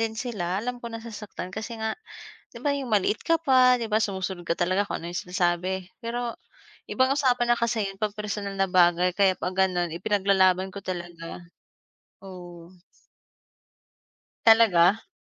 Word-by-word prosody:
din 225 -1 -1
sila, 205 -7 -3
alam 245 0 -4
ko 235 - -6
nasasaktan 225 -5 -8
kasi 220 +3 -6
nga, 220 0 -2 0.6
'di - - -10
ba, 290 - 0
'yong 270 -3 -5
maliit 205 +1 +2
ka 330 -1 +2
pa, 255 -4 +5
'di 225 - -3
ba 215 - +3
sumusunod 190 -4 -3
ka - - +1
talaga 185 +4 0
kung - - -5
ano 170 - -6
'yong 175 - -4
sinasabi. 180 +1 -1
Pero, 235 0 -4 0.5
ibang 260 +1 +2
usapan 250 -4 +2
na - - -3
kasi 225 -2 0
yun 195 +1 -8
'pag 210 -1 -2
personal 205 -1 -4
na 195 - +3
bagay, 180 -1 +3
kaya 190 0 +3
'pag 180 - -3
gano'n 180 -3 +1
ipinaglalaban 190 0 +2
ko 200 - -7
talaga, 175 -2 -7 0.8
oo. 175 -2 -11 1.7
Talaga? 225 -3 +5
195 Hz, 160 wpm, -26 LUFS, 180-230 Hz, 1.7 s, pa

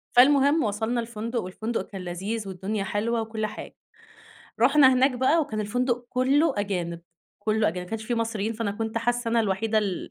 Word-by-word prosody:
فالمهم 285 +4 +5
وصَلنا 220 +3 -1
الفندق، 230 +1 -4
والفندق 220 +6 -4
كان 195 -3 -8
لذيذ 195 +5 -4
والدنيا 195 +2 -3
حلوة 225 +4 -1
وكل 220 -1 -3
حاجة، 215 - -8 0.9
رُحنا 275 -3 +6
هناك 260 +2 +4
بقى 260 +6 +2
وكان 220 -8 -3
الفندق 245 +3 -1
كلّه 270 +5 +2
أجانب، 180 -4 -2 0.4
كلّه 215 0 +1
أجانب، 180 +2 -4
ما - - -15
كانش 225 0 -4
في 240 - -1
مصريين، 225 -2 -1
فأنا 225 -2 -2
كنت 220 +2 -3
حاسّة 240 +1 -1
أنا 230 0 +3
الوحيدة 215 +1 +1
ال 195 -4 -3
225 Hz, 170 wpm, -26 LUFS, 205-245 Hz, 0.9 s, رُحنا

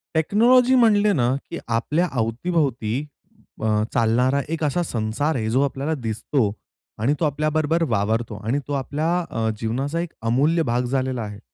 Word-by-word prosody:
Technology 240 +10 +4
म्हणले 210 -4 +4
ना 125 -4 +2
की 170 - -5
आपल्या 150 +10 0
अवती-भोवती 125 -1 -1 0.7
अ, - - -1 0.3
चालणारा 125 +4 +2
एक 165 0 -3
असा 150 +4 +1
संसार 120 +3 -1
आहे 110 -3 -1
जो 130 +4 +2
आपल्याला 140 +3 -2
दिसतो. 115 -2 -1 0.5
आणि 135 +6 +2
तो 165 - +1
आपल्याबरोबर 155 +2 0
वावरतो 110 +1 0
आणि 125 +6 +1
तो 145 - -3
आपल्या 145 +4 -1 0.2
अ, 110 -1 -1
जीवनाचा 135 +8 -2
एक 170 -1 -4
अमूल्य 150 +8 +2
भाग 125 +1 +1
झालेला 130 -2 -1
आहे. 105 -1 -7
135 Hz, 150 wpm, -22 LUFS, 115-160 Hz, 0.7 s, Technology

